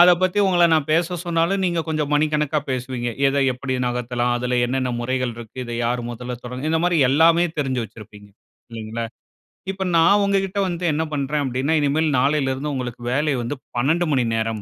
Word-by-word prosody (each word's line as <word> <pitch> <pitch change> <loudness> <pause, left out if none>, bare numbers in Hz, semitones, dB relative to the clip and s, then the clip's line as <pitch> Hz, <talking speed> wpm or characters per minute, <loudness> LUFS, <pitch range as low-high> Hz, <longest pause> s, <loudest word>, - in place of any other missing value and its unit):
அத 180 +1 +9
பத்தி 185 +2 +1
உங்கள 175 -2 +4
நான் 155 -1 +1
பேச 170 +2 +1
சொன்னாலும் 170 +3 +1
நீங்க 170 -2 +1
கொஞ்சம் 150 -2 -1
மணிக்கணக்கா 150 0 +1
பேசுவீங்க. 125 -1 -3 0.2
எத 140 - -1 0.2
எப்படி 130 +1 -4
நகத்தலாம்? 125 0 -1
அதுல 125 0 0
என்னன்ன 130 0 -1
முறைகள் 125 0 -1
இருக்கு? 115 +1 -11
இத 120 - -6
யார் 120 +1 0
முதல்ல 125 +1 -6
தொடங்க 125 +5 -4
இந்த 160 0 +2
மாரி 175 -2 +2
எல்லாமே 165 +4 +5
தெரிஞ்சு 130 -4 0
வச்சிருப்பீங்க, 105 -1 -13 0.4
இல்லைங்களா? 115 +1 -5 0.7
இப்ப 190 0 -4
நான் 200 +5 +5
உங்ககிட்ட 195 0 0
வந்து 175 0 -4
என்ன 160 +2 0
பண்றேன் 145 +1 -1
அப்டீன்னா 130 +4 -1
இனிமேல் 150 +2 +1
நாளைலலிருந்து 140 +1 0
உங்களுக்கு 125 -2 -5
வேலை 150 +2 +1
வந்து 120 +5 -3 0.2
12 160 +8 +2
மணி 130 -3 +2
நேரம். 110 -1 -2
140 Hz, 170 wpm, -22 LUFS, 125-165 Hz, 0.7 s, அத